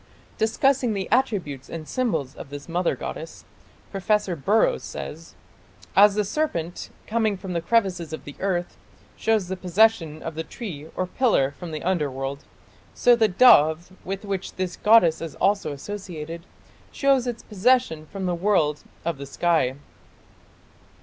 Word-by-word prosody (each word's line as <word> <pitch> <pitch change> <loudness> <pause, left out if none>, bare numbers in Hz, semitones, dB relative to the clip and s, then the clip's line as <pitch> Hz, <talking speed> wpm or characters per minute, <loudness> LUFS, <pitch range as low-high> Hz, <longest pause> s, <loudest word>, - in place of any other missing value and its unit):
" - - -30
Discussing 250 +1 +2
the 195 -2 -3
attributes 200 - 0
and 160 -2 -7
symbols 165 - -1
of 140 - -10
this 145 0 -8
mother 175 +1 0
goddess, - - -7 0.5
Professor 195 -1 0
Burrows 220 - +2
says: - - -8 0.6
"As 200 0 +7
the 210 -1 +1
serpent, 185 - -2 0.2
coming 220 -2 0
from 185 -1 -6
the 170 - -1
crevices 185 -5 +1
of 160 - -6
the 145 - -9
earth, 180 -2 -2 0.4
shows 220 -4 +1
the 190 - -3
possession 185 -4 +2
of 165 - -4
the 160 +1 -4
tree 160 -6 -7
or 185 - -1
pillar 185 - +2
from 175 +4 -9
the 155 -1 -5
underworld, 140 -6 -2 0.5
so 245 -1 +5
the 225 -2 +3
dove, 175 -6 +5
with 195 +2 -5
which 195 -2 -4
this 185 -1 -3
goddess 210 -7 +5
is 165 -3 -6
also 200 -6 +1
associated, 170 0 -7 0.4
shows 270 -3 +2
its 240 -2 -4
possession 210 -7 +1
from 190 +4 -5
the 180 - 0
world 170 -5 +1 0.2
of 165 -4 -2
the 140 - -7
sky". 155 -4 +1
185 Hz, 150 wpm, -24 LUFS, 160-215 Hz, 0.6 s, As